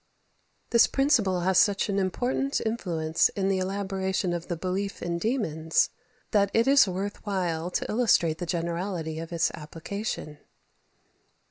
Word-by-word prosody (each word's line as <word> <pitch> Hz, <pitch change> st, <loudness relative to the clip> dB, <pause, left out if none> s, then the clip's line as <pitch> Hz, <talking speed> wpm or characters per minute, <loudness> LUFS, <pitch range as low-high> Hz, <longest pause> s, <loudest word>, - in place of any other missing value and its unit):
This 235 Hz, -2 st, +6 dB
principle 230 Hz, -10 st, +2 dB
has 185 Hz, +1 st, +3 dB
such 200 Hz, -1 st, +3 dB
an 200 Hz, -1 st, 0 dB
important 250 Hz, +8 st, 0 dB
influence 165 Hz, -8 st, +1 dB
in 195 Hz, -1 st, -1 dB
the 190 Hz, -1 st, +1 dB
elaboration 190 Hz, -1 st, -1 dB
of 175 Hz, 0 st, -4 dB
the 175 Hz, -, -3 dB
belief 190 Hz, +3 st, -3 dB
in 170 Hz, 0 st, -2 dB
demons, 165 Hz, -, 0 dB, 0.4 s
that 200 Hz, -2 st, +3 dB
it 230 Hz, +2 st, +3 dB
is 275 Hz, -4 st, +6 dB
worth 195 Hz, +2 st, -4 dB
while 180 Hz, -5 st, -2 dB
to -, -, -2 dB
illustrate 210 Hz, -9 st, +2 dB
the 175 Hz, -, -4 dB
generality 170 Hz, -1 st, -3 dB
of 165 Hz, +1 st, -7 dB
its 170 Hz, -1 st, +1 dB
application. 160 Hz, 0 st, -6 dB
190 Hz, 140 wpm, -27 LUFS, 170-205 Hz, 0.4 s, This